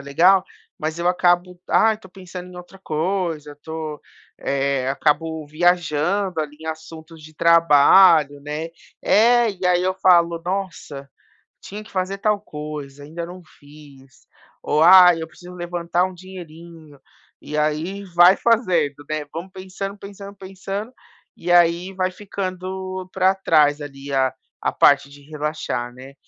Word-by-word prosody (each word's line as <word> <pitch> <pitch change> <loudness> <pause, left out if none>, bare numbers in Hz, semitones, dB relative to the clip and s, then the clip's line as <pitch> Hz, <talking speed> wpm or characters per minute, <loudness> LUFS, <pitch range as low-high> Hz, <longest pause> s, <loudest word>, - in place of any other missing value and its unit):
legal, 175 +7 +3 0.3
mas 160 +2 -4
eu 170 - -2
acabo, 180 0 +1
ai, 220 0 +4
estou 190 -4 -17
pensando 180 -1 -10
em 180 - -12
outra 180 +2 -12
coisa, 165 -2 -2
eu - - -11
estou, 155 0 -7 0.9
acabo 155 +2 -1
viajando 175 +3 0
ali 150 -1 -6
em 160 - -10
assuntos 160 0 -9
de 155 +1 -13
trabalho, 165 -2 +5
né. 150 +3 -5 0.3
É. 235 +2 +4
E 185 -1 -9
aí 180 -1 +3
,eu 185 0 0
falo: 170 -3 +3
"Nossa, 180 -7 -5 0.5
tinha 210 +2 -9
que 215 - -17
fazer 190 +1 -2
tal 210 0 +1
coisa, 150 -5 -8
ainda 165 +4 -7
não 180 +2 -11 0.2
fiz." 145 -3 -18 0.4
Ou: 150 +1 +1
"Ai, 180 -1 +8
eu 160 - -5
preciso 180 +2 -14
levantar 175 0 -1
um 185 - -6
dinheirinho." 170 -4 -13 0.5
E 150 - -4
aí 155 +7 -2
vai 175 +2 +7
fazendo, 180 - +1
né, 155 -1 -3
vamos 170 +4 -7
pensando, 190 +2 -7
pensando, 200 0 -10
pensando, 195 +4 -7 0.4
e 175 - -3
aí 175 +2 +3
vai 185 0 -1
ficando 185 -1 -6
para 190 0 +2
trás 150 -5 +2
ali 140 -1 -8
a 130 -1 +1 0.3
a - - 0
parte 140 0 +4
de 145 0 -15
relaxar, 150 -5 -4
né. 130 +2 -13
170 Hz, 145 wpm, -21 LUFS, 150-185 Hz, 0.9 s, Ai